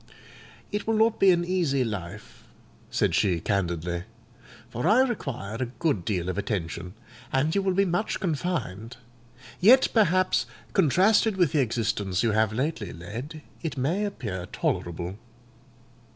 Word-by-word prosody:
"It 210 0 -3
will 225 - +2
not 225 +1 +3
be 195 - +6
an 175 -1 +3
easy 170 -8 +1
life;" 105 -3 -7 0.5
said - - +1
she 90 -4 +2
candidly, 85 -2 -2 0.6
"for 120 +8 -3
I 220 +6 +6
require 135 - -3
a 130 - -1
good 140 - 0
deal 90 -5 -1
of 95 +2 -2
attention, 90 -2 -4 0.4
and 145 +4 +1
you 200 - +2
will 190 -1 0
be 195 +1 +3
much 180 +4 -1
confined; 150 - -3 0.6
yet, 250 +8 +6
perhaps, 185 -4 +3 0.3
contrasted 195 - +3
with 175 -6 +3
the 155 - +2
existence 105 -5 -1
you 115 - +2
have 110 0 +2
lately 120 - -2
led, 120 - -8 0.2
it 160 -4 -4
may 160 +11 0
appear 110 - -4
tolerable." 85 +3 -3
130 Hz, 140 wpm, -26 LUFS, -, 0.6 s, be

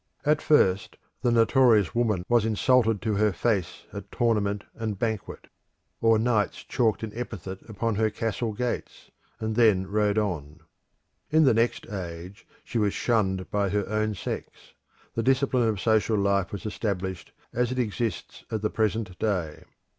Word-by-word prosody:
At 150 +1 +3
first 95 -10 +2 0.2
the 120 - +2
notorious 115 - +4
woman 110 -7 0
was 120 -2 +3
insulted 115 0 +2
to 110 -1 0
her 105 0 +3
face 95 -2 -1
at 100 -1 -8
tournament 105 -4 0
and 110 -3 -4
banquet; 110 -1 -3 0.6
or 115 -1 +5
knights 110 -2 0
chalked 115 -3 0
an 110 - -4
epithet 95 -6 -6
upon 110 +2 -1
her 110 0 +2
castle 115 +1 -2
gates, 120 +3 -4 0.3
and 110 -1 -2
then 105 -5 +4
rode 105 +1 +1
on. 80 -7 -2 0.7
In 160 +1 +4
the 130 -5 +5
next 115 +2 0
age 90 0 -7 0.2
she 120 - -2
was 105 -2 +1
shunned 95 -6 0
by 100 -1 +1
her 100 0 -1
own 110 0 -1
sex: - - -7 0.4
the 115 - -1
discipline 130 -1 +2
of 105 -3 -2
social 110 0 +2
life 100 -1 +1
was 100 - -6
established 95 -4 -3 0.2
as 125 0 0
it 130 - -3
exists 115 -4 -3
at 110 -2 -3
the 105 - 0
present 110 -4 -1
day. 90 -8 -2
110 Hz, 155 wpm, -26 LUFS, 100-115 Hz, 0.7 s, or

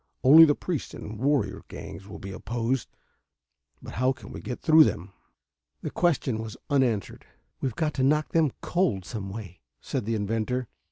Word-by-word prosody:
Only 155 +5 +10
the 145 -2 +3
priests 170 -9 -4
and 105 0 -8
warrior 140 +2 +1
gangs 95 - -9
will 105 - -8
be 100 - -8
opposed. 115 +5 -2 0.9
But - - -8
how 130 +1 +3
can - - -13
we - - -7
get 125 - -5
through 160 -1 +7
them?" 95 - -2 0.7
The - - -3
question 135 -9 +1
was 110 +1 -6
unanswered. 120 - +1 0.4
"We've 130 -5 -2
got 155 -2 0
to 130 - -1
knock 150 +3 +2
them 160 -4 +2
cold 170 - 0
some 100 -2 -5
way," 95 -3 -8 0.2
said - - -3
the 115 +1 0
inventor. 115 +4 -1
125 Hz, 170 wpm, -27 LUFS, 105-145 Hz, 0.9 s, Only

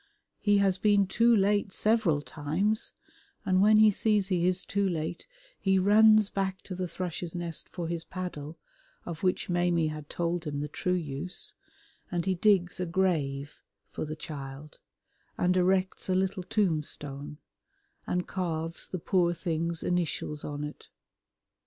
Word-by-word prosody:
He 205 -1 +3
has 195 -2 +2
been 205 0 +4
too 230 +5 +4
late 205 -1 +2
several 210 -9 +2
times, 165 +10 -1 0.5
and 185 0 +3
when 215 +1 +6
he 215 0 +7
sees 205 -1 +1
he 180 -2 +2
is 185 0 0
too 200 -1 0
late 165 - -4 0.3
he 195 -1 +2
runs 215 +2 +6
back 190 -1 -2
to 190 - -7
the 180 0 -3
Thrush's 175 -1 -4
Nest 170 -2 -4
for 175 -2 -5
his 170 -1 -3
paddle, 165 -4 -6 0.5
of 170 -3 -6
which 185 -1 0
Maimie 175 -2 +2
had 155 -1 -7
told 170 0 -2
him 145 -2 -3
the 150 - -2
true 180 +5 -1
use, 160 +2 -2 0.6
and 175 -1 -2
he 190 - +2
digs 185 -1 +2
a 180 - -1
grave 155 -6 -1 0.3
for - - -4
the 155 0 -4
child 145 -2 -8 0.6
and 180 +1 +2
erects 185 +1 +1
a 185 - +2
little 190 +1 0
tombstone 150 -7 -2 0.7
and 180 0 -1
carves 165 -3 -3
the 185 - -4
poor 175 0 +1
thing's 165 -1 -2
initials 165 -4 -1
on 145 0 -4
it. 150 0 -8
180 Hz, 150 wpm, -29 LUFS, 160-195 Hz, 0.7 s, he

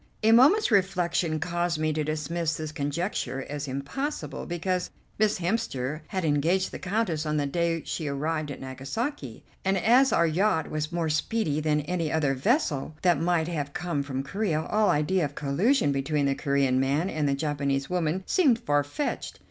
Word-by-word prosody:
A 220 - +5
moment's 280 - +6
reflection 180 -5 +1
caused 175 0 -1
me 155 0 0
to 155 0 -1
dismiss 155 +2 -2
this 155 -1 -5
conjecture 145 -1 -2
as 145 0 -5
impossible, 150 - -4
because 180 +1 -1 0.3
Miss 215 0 +3
Hemster 160 - -2
had 185 -3 -2
engaged 160 +6 +1
the - - -7
Countess 180 -5 -1
on 150 -1 -1
the 145 - +1
day 165 +2 0
she 160 - -3
arrived 150 +2 -2
at 140 - -6
Nagasaki, 135 - -5 0.2
and, 190 0 +2
as 250 +8 +4
our 170 - +4
yacht 165 0 +1
was 155 +1 -2
more 170 -1 -1
speedy 155 -1 0
than 150 -1 +1
any 165 0 -2
other 150 -4 +1
vessel 155 - 0
that 175 -5 +3
might 170 -1 +1
have 145 -4 -3
come 175 -5 -2
from 135 -1 -3
Corea, 160 0 -1
all 215 0 +2
idea 165 +5 +2
of 145 -1 -3
collusion 150 - +2
between 140 +1 0
the 140 - +2
Corean 140 -2 +1
man 140 +6 +1
and 155 -6 -1
the 140 - +1
Japanese 140 -2 -1
woman 180 0 -1
seemed 285 -11 +3
far 145 -11 +1
fetched. 275 - -4
160 Hz, 175 wpm, -27 LUFS, 145-185 Hz, 0.3 s, moment's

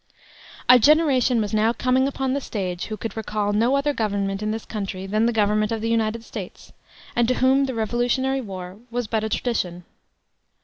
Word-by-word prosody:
A 250 0 +8
generation 270 -3 +4
was 210 -1 -3
now 220 +2 +3
coming 255 +2 +2
upon 270 -1 -2
the 280 - -1
stage 185 -7 -4
who 215 - -5
could 225 - -5
recall 210 -2 -2
no 230 +6 +3
other 285 +1 +1
government 200 -4 -1
in 215 - -1
this 220 +1 -3
country 195 -3 -5
than 215 +4 +1
the - - +2
government 215 -1 +1
of 225 - -1
the 225 +1 -1
United 225 0 0
States, - - -9 0.4
and 240 -1 +3
to 255 - +2
whom 265 +2 +3
the 260 -2 -4
Revolutionary 245 +4 0
War 185 -3 -8
was 245 +1 -2
but 220 0 -1
a 220 - -2
tradition. 180 -7 -2
225 Hz, 190 wpm, -23 LUFS, 210-255 Hz, 0.4 s, A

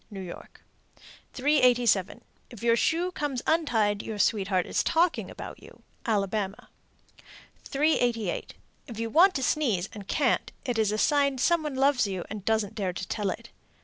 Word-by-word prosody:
New 200 -3 -8
York. 180 -2 -10 0.7
387. 245 -7 +3 0.3
If 235 -3 -12
your 230 -1 +4
shoe 335 +9 +1
comes 290 -7 -3
untied, 225 -11 +1
your 220 - -6
sweetheart 195 -3 +1
is - - 0
talking 335 +1 +1
about - - -9
you. - - -16 0.2
Alabama. 200 -2 -1 1.0
388. 245 - 0 0.3
If 235 -5 -9
you 230 0 -3
want 370 - +5
to 265 - -1
sneeze 230 - 0
and 205 -2 -9
can't, 275 0 +1
it 245 -4 -1
is 215 -2 +2
a 215 - -1
sign 280 +2 +2
some 340 +6 +2
one 300 -3 -4
loves 270 -4 +3
you, 190 -3 -4
and 210 -2 -6
doesn't 220 -1 0
dare 190 -4 -2
to 185 - -6
tell 210 -3 -2
it. 230 +5 -6
230 Hz, 160 wpm, -27 LUFS, 205-280 Hz, 1.0 s, want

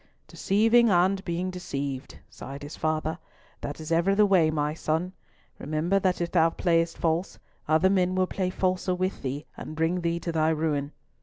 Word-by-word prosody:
"Deceiving 225 +4 +3
and 190 +1 +3
being 175 +2 -2
deceived," 140 -7 -5
sighed 140 +2 -9
his 145 - -7
father. 155 +1 -1 0.4
"That 145 - -5
is 155 +1 -7
ever 170 +4 +3
the 210 +1 +5
way, 185 -6 +4
my 150 -1 -1
son! 165 +3 -2 0.5
Remember 155 +6 0
that 185 -2 0
if 170 -1 -2
thou 165 -2 +4
playest 165 -1 0
false, 165 +3 -1 0.3
other 160 +5 +4
men 185 -1 +2
will 185 0 +2
play 185 0 -2
falser 185 0 0
with 185 +1 -2
thee 140 +3 -4
and 155 - -8
bring 165 +3 0
thee 170 0 -1
to 170 - -3
thy 160 -1 +2
ruin. 150 -3 -1
170 Hz, 175 wpm, -27 LUFS, 155-185 Hz, 0.5 s, the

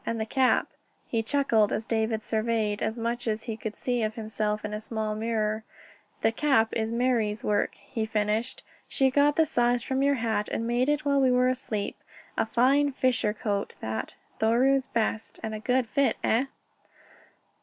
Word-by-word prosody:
And 230 0 -2
the 220 - -1
cap...." 255 +3 +2 0.4
He 230 - +1
chuckled 225 -4 +2
as 220 - -2
David 220 -1 0
surveyed 220 -2 0
as 220 - -1
much 235 +1 -2
as 220 0 -1
he 225 - -4
could 220 -1 -6
see 245 -2 -1
of 215 0 -1
himself 215 -1 -2
in 210 - -4
a 210 - -4
small 220 -1 -3
mirror. 215 0 -1 0.6
"The 225 - +4
cap 230 -3 +2
is 220 0 -1
Marie's 230 -3 0
work," 205 -1 0
he 220 +2 -4
finished. 215 +3 -1 0.2
"She 265 -1 +2
got 290 +2 +4
the 320 - +4
size 245 -4 +1
from 265 0 -1
your 280 0 +3
hat 225 -4 -1
and 230 - -2
made 240 +3 +1
it 295 0 0
while 280 -1 +3
we 260 - +4
were 250 0 +3
asleep. 230 -5 -3 0.4
A - - 0
fine 275 +5 +3
fisher 255 -5 +1
coat 205 -1 -3
that 110 0 -4 0.2
Thoreau's 260 +4 +3
best. 225 -1 -2
And 220 0 -3
a 215 - -4
good 250 +3 +1
fit, 280 +4 +1
eh?" 235 +5 +2
225 Hz, 180 wpm, -27 LUFS, 215-255 Hz, 0.6 s, The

